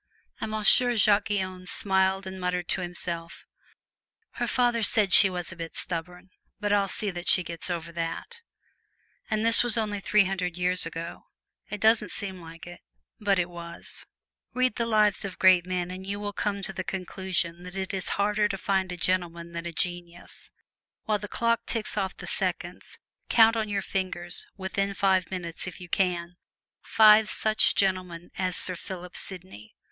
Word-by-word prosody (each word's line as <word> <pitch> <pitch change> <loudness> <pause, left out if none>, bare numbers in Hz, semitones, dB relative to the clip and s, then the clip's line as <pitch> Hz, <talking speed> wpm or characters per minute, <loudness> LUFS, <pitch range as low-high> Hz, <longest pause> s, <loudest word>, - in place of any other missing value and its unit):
And - - -3
Monsieur 215 +3 +4
Jacques 205 -1 +4
Guyon 185 -3 -3
smiled 190 0 0
and 190 0 -7
muttered 180 -1 -1
to 190 - 0
himself, 170 -1 -5 0.9
"Her - - -3
father 245 -2 +2
said 205 -2 +2
she 195 - +10
was 180 -1 -4
a - - -9
bit 165 -1 -7
stubborn, 180 +2 -5 0.3
but 205 -1 0
I'll 200 -1 +3
see 205 +1 -3
that 175 -1 -7
she 185 - +6
gets 170 +1 -6
over 170 -1 -4
it!" 170 - -5 0.9
And 215 0 0
this 230 +1 +6
was 240 -1 +2
over 210 -2 -1
three 210 +1 +3
hundred 180 -2 -2
years 180 -1 -1
ago. 165 +1 -7 0.4
It 210 - -5
doesn't 220 +2 +3
seem 190 -3 -5
like 165 0 -11
it, 175 0 -11 0.4
but 200 -2 +2
it 175 -1 +1
was. 170 -1 -10 0.5
Read 255 -1 +2
the 235 -1 0
lives 215 -3 +3
of 195 -2 -6
great 185 -2 +5
men 180 -1 -2
and 190 +1 -8
you 200 +1 -3
will 205 0 -4
come 200 -1 -2
to 195 - -3
the 185 - -4
conclusion 185 -2 -3
that 180 +1 -10
it 190 0 -4
is 190 -2 -1
harder 210 +1 +2
to 195 - -3
find 190 -1 0
a 180 - -5
gentleman 170 -1 -1
than 170 0 -5
a - - -5
genius. 175 +1 -3 0.5
While 210 -1 0
the 210 - -6
clock 230 +2 0
ticks 225 -3 -2
off 195 -3 -2
the - - -9
seconds, - - -4 0.3
count 225 0 +6
on 220 -2 -1
your 200 -1 -1
fingers 180 -2 -3
within 195 +1 -2
five 190 -2 +2
minutes, 175 -2 -5
if 180 - -8
you 180 - -9
can 175 -2 -1 0.4
five 215 0 +6
such 215 0 +3
gentlemen 185 -3 -1
as 185 -1 -1
Sir 180 - +1
Philip 180 0 -8
Sidney! 180 - -8
190 Hz, 180 wpm, -27 LUFS, 175-205 Hz, 0.9 s, she